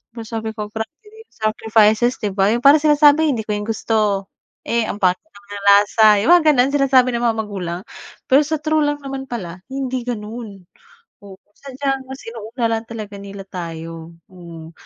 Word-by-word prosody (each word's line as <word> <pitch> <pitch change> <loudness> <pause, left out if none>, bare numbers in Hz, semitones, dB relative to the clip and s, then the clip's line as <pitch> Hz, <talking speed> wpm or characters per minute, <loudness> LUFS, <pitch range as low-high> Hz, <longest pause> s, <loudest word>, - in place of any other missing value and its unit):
Pero 230 - -6
sabi 220 -1 -4
ko 210 -1 -5
grabe 220 +1 -4
din 440 +1 -16
sacrifices, 220 +2 +2
'di 210 - -1
ba? 195 +1 +3
Yung 240 - -1
parang 280 +2 +8
sinasabi 300 0 +5
hindi 230 - -2
ko - - -2
yan 205 - -5
gusto, 215 -3 -1 0.4
eh, 235 -1 +1
ang 205 - -6
pangit 185 -1 +3 0.2
ng 200 0 -10
lasa, 205 +2 +5 0.2
yung 215 - 0
mga 315 -3 +4
ganon 255 0 +3
sinasabi 265 -3 +4
ng 235 0 -2
mga 225 -1 +1
magulang. 185 -4 -5 0.5
Pero 270 +2 +6
sa 315 +2 -1
true 310 0 +1
lang 290 0 -2
naman 270 -1 -6
pala 190 -9 -7
hindi 260 -2 -3
ganon. 215 -4 -7 0.6
Oo, 195 - -11 0.2
sadyang 270 0 -4
mas 265 +1 -9
inuuna 230 +2 -5
lang 225 0 -1
talaga 215 -3 -8
nila 200 0 -9
tayo, 165 -2 -7 0.2
hmm. 170 -3 -11
225 Hz, 180 wpm, -19 LUFS, 200-265 Hz, 0.6 s, parang